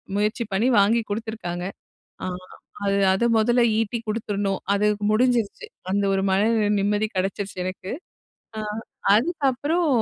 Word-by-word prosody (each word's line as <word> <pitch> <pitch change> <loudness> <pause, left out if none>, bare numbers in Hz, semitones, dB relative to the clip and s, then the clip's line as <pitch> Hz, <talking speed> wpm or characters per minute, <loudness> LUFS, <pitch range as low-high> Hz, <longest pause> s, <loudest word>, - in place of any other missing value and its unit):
முயற்சி 215 +4 0
பண்ணி 220 +6 +2
வாங்கி 225 +4 +4
குடுத்துருக்காங்க. 205 -5 -4 0.6
ஆ, - - -2 0.6
அது 200 0 +2 0.2
அத 215 - 0
மொதல்ல 240 +2 +3 0.2
ஈட்டிக் 225 +1 -2
குடுத்துரணும். 205 -3 -1
அது 205 +1 +2 0.3
முடிஞ்சிருச்சி, 245 - +1 0.3
அந்த 200 0 +1
ஒரு 195 - +1
மன 190 - +3 0.4
நிம்மதி 205 +2 +1
கிடைச்சிருச்சி, 195 +1 -2
எனக்கு. 185 +1 -6 0.7
அ, - - -2 0.6
"அதுக்கப்பறம் 295 +4 +1
215 Hz, 120 wpm, -24 LUFS, 200-235 Hz, 0.7 s, வாங்கி